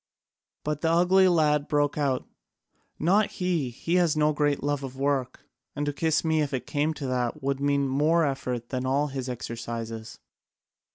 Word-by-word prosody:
But 150 0 -2
the 160 - +2
ugly 180 +3 +5
lad 150 -4 +2
broke 145 -1 +1
out: 140 -4 -1 0.7
"Not 200 +6 +2
he! 175 -8 -1
He 165 +9 -1
has 170 -4 +2
no 150 0 +3
great 145 -1 0
love 145 0 0
for 135 - -5
work. 135 -1 -2 0.3
And 145 +1 -2
to 145 - -1
kiss 160 +2 +1
me, 160 -1 +2
if 145 -2 -1
it 130 - -4
came 150 +2 0
to 145 - -5
that, 125 +2 -2
would 135 0 0
mean 140 0 +1
more 155 +5 +2
effort 125 -4 -3
than 130 0 -2
all 140 +3 +1
his 135 -1 -4
exercises." 115 -2 -6
145 Hz, 175 wpm, -27 LUFS, 130-155 Hz, 0.7 s, ugly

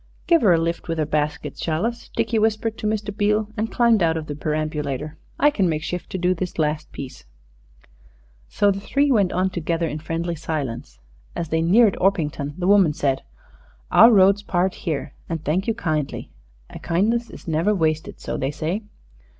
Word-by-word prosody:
"Give 335 -1 +4
her 205 - +5
a 170 - +5
lift 165 +1 -2
with 165 -1 -2
her 155 - +1
basket, 150 0 -2
shall 160 +4 -1
us?" 235 0 -4
Dickie 225 - +1
whispered 220 +1 0
to 215 - -2
Mr. 210 -1 -2
Beale 210 +1 +1
and 225 0 -2
climbed 235 -4 +3
out 165 -1 +2
of 160 - -4
the 145 - -5
perambulator. 150 -1 -3 0.2
"I 295 - +5
can 195 -10 +1
make 155 -1 -2
shift 180 +2 -4
to - - -4
do 180 0 +2
this 180 0 -5
last 155 -1 -1
piece." 135 -2 -9 1.2
So 205 -1 +3
the 195 - -3
three 280 +7 +1
went 200 -7 +3
on 185 +1 0
together, 170 -1 -1
in 155 0 -4
friendly 165 +2 -3
silence. 150 -7 -4 0.4
As 165 - -3
they 160 0 +1
neared 200 +5 +4
Orpington 150 -7 0
the 180 - -2
woman 195 -5 +5
said, 135 -2 0 0.7
"Our 230 +2 +8
road 200 -1 +5
parts 180 0 0
here; 155 -4 -3 0.2
and 165 -2 -4
thank 175 +6 0
you 225 - +1
kindly. 155 -9 -3 0.4
A - - -8
kindness 220 +8 0
is - - -12
never 165 +6 +1
wasted, 160 -3 -1
so - - -4
they 135 - -1
say." 155 +8 -3
170 Hz, 190 wpm, -22 LUFS, 155-205 Hz, 1.2 s, Our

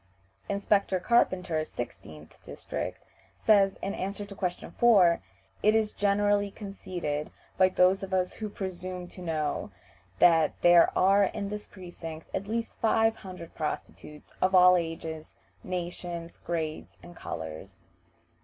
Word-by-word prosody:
Inspector 200 -1 +1
Carpenter, 180 -8 +2
16th 80 - -8
district, - - -6 0.3
says, 200 -3 +4
in 195 - -2
answer 200 +2 -4
to 200 - -10
question 180 -2 -4
4, 195 -8 +5 0.4
"It 215 +1 +4
is 220 -1 +1
generally 205 0 +2
conceded 185 -7 -5 0.3
by 185 0 +5
those 185 +1 +3
of 195 -1 -6
us 185 -1 0
who 215 -1 -5
presume 185 -2 -6
to 185 - -12
know 155 -4 -2 0.5
that 165 -3 +4
there 175 -1 +7
are 195 +2 +5
in 200 +1 -4
this 210 0 -6
precinct 165 -4 -9
at 200 - -3
least 230 +1 -2
five 225 0 +3
hundred 180 -4 -10
prostitutes, 150 0 -6
of 185 +1 +3
all 180 0 +8
ages, 165 -2 -4 0.3
nations, 175 -1 -5
grades, 160 -2 -4
and 175 0 -12
colors." 80 - -7
185 Hz, 130 wpm, -28 LUFS, 165-200 Hz, 0.5 s, all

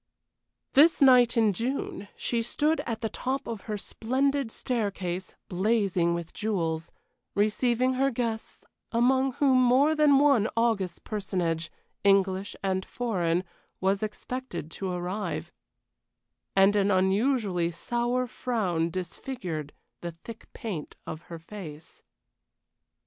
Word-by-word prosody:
This 315 +4 +6
night 250 -3 +6
in 220 -3 +4
June 230 -1 -3
she 235 -1 -1
stood 300 +7 +1
at 230 -2 -3
the 225 - -1
top 265 +4 -3
of 225 -4 -5
her 210 - -1
splendid 265 +5 0
staircase, 190 -8 -3
blazing 185 -3 +1
with 170 -1 -6
jewels, 165 -6 -2 0.4
receiving 240 +5 +2
her 270 +2 +2
guests, 230 -3 -4 0.3
among 260 +3 +3
whom 260 -1 +4
more 260 +5 +5
than 300 -3 +5
one 275 -6 +4
august 220 -6 0
personage, 175 -6 -2 0.3
English 195 0 +2
and 190 -1 0
foreign, 180 -9 -1 0.4
was 195 +2 +1
expected 215 - -5
to 190 +3 -4
arrive; 180 +4 -3 1.0
and 195 +1 +5
an 200 -1 +3
unusually 190 -1 +2
sour 240 +8 -1
frown 190 -10 -1
disfigured 175 - -5 0.3
the 170 -1 -5
thick 230 -1 -10
paint 190 -10 -6
of 160 - -6
her 170 - -6
face. 160 -3 -10
215 Hz, 115 wpm, -28 LUFS, 185-250 Hz, 1.0 s, This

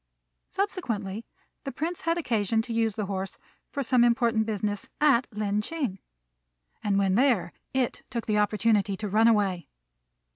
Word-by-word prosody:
Subsequently, 230 - -3 0.4
the 275 - -4
Prince 330 +5 -3
had 330 +1 0
occasion 225 - +1
to 230 - -5
use 225 -2 +1
the 210 - -2
horse 190 0 -4 0.3
for 280 - -3
some 250 -1 +4
important 235 -2 +2
business 205 -1 -2
at 275 -5 +4
Lin 210 -1 -1
ch'ing; 255 - -3 0.8
and 200 -2 +1
when 195 -1 +2
there 220 -7 +2 0.2
it 260 -2 -1
took 235 -3 -3
the 210 -1 +1
opportunity 210 -1 +2
to 215 - -4
run 215 +3 +4
away. 200 -6 +2
220 Hz, 150 wpm, -27 LUFS, 205-250 Hz, 0.8 s, some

